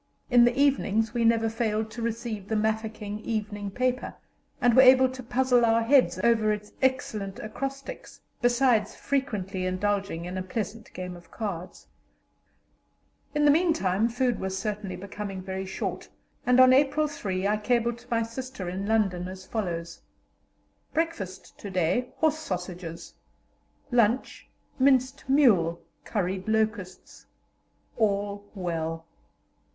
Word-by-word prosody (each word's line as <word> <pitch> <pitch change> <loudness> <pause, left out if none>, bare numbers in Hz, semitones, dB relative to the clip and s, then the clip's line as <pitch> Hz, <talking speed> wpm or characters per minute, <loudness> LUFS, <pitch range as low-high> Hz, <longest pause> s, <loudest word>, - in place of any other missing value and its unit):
In 240 -1 +7
the 240 +2 +1
evenings 225 -6 +2
we 240 -1 0
never 225 0 +3
failed 220 -1 -1
to 235 +2 -7
receive 225 -3 -3
the 220 - -1
Mafeking 215 -1 -2
evening 210 -2 -3
paper, 255 +5 -1 0.4
and 245 -1 +4
were 260 - +9
able 260 0 +7
to 260 0 -7
puzzle 250 0 +2
our 230 0 +3
heads 265 +2 +4
over 225 -2 +3
its 210 0 -4
excellent 220 -7 -1
acrostics, 275 - -6 0.2
besides 245 -2 +3
frequently 210 -9 -2
indulging 195 -2 -1
in 185 +1 -4
a - - -2
pleasant 210 +3 -5
game 180 -1 -6
of 175 -1 -15
cards. 190 -6 -6 1.5
In 295 0 +3
the 290 - +7
meantime 260 - +2
food 245 0 0
was 190 0 -3
certainly 205 -1 -3
becoming 200 0 -6
very 190 +1 -5
short, 190 - -4 0.4
and 250 0 +5
on 255 0 +8
April 290 +3 +3
3 200 -10 -2
I 210 +1 +2
cabled 235 +1 0
to 245 +1 -20
my 230 -2 +1
sister 230 -3 -6
in 190 +3 -3
London 195 -5 +1
as 185 0 -9
follows: 170 -6 -4 0.9
"Breakfast 270 - -3
to 200 - -7
day, 185 +7 0
horse 315 -1 +2
sausages; 175 - -6 0.8
lunch, 235 +1 +1 0.3
minced 265 0 +3
mule, 195 - +4 0.3
curried 190 -2 -2
locusts. 220 -4 -2 0.7
All 205 -2 0
well." 165 -3 -3
220 Hz, 135 wpm, -27 LUFS, 190-245 Hz, 1.5 s, were